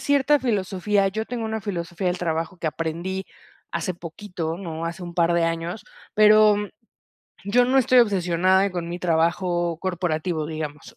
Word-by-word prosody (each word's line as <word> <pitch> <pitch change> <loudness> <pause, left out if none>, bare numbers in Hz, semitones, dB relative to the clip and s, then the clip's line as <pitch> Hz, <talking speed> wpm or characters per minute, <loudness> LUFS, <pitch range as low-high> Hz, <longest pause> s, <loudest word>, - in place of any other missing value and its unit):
cierta 285 +1 +3
filosofía. 200 -3 0
Yo 220 +3 -2
tengo 235 0 -4
una 220 0 -3
filosofía 180 -2 -3
del 180 - -1
trabajo 165 +1 -2
que 170 - -4
aprendí 170 +5 -3 0.5
hace 185 - -2
poquito, 170 -1 -5
¿no? 165 -3 -5
Hace 170 +2 -6
un 170 -1 -8
par 170 0 +2
de 170 - +2
años, 165 +4 -3 0.3
pero 215 -1 +6 0.9
yo 240 +5 +4
no 260 +2 +3
estoy 255 0 +4
obsesionada 190 -2 +3
con 175 -2 -4
mi 175 +1 -5
trabajo 175 0 +1
corporativo, 170 -3 -2
digamos. 155 +7 -6
180 Hz, 155 wpm, -24 LUFS, 170-210 Hz, 0.9 s, pero